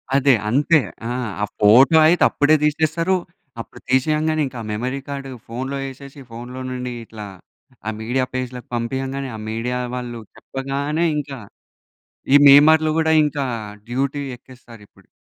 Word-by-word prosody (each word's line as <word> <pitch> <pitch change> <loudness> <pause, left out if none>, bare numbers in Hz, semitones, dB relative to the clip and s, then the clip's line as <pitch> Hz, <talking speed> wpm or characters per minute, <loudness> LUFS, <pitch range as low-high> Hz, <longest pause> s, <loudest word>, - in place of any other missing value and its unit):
అదే. 140 0 +4 0.2
అంతే 150 +6 +3 0.3
ఆ! - - -3 0.3
ఆ - - +1 0.2
ఫోటో 125 +10 +6
అయితే 175 +2 +3
అప్పుడే 145 +2 +3
తీసేస్తారు. 160 +4 +1 0.5
అప్పుడు - - -13
తీసేయంగానే 155 +4 +1
ఇంకా 130 -1 -10
ఆ - - -7
మెమరీ 125 +6 -3
కార్డు 140 -1 -6 0.2
ఫోన్‌లో 130 +4 -4
ఏసేసి, 140 +1 -12
ఫోన్‌లో 125 +3 -8
నుండి 125 -1 -4
ఇట్లా 110 -1 -9 0.6
ఆ - - +1
మీడియా 125 +4 -1
పేజ్‌లకి 125 -1 -5
పంపియ్యంగానే 135 +3 -3
ఆ - - -7
మీడియా 120 +3 -2 0.2
వాళ్ళు 120 -2 -5 0.2
చెప్పగానే 140 +5 -3
ఇంకా 140 -2 -5 1.0
ఈ - - +9
మీమర్‌లు 155 +3 +7
కూడా 160 0 +2
ఇంకా 145 -1 -1 0.5
డ్యూటీ 135 +3 -1
ఎక్కేస్తారిప్పుడు. 120 -4 -17
135 Hz, 135 wpm, -20 LUFS, 125-145 Hz, 1.0 s, ఈ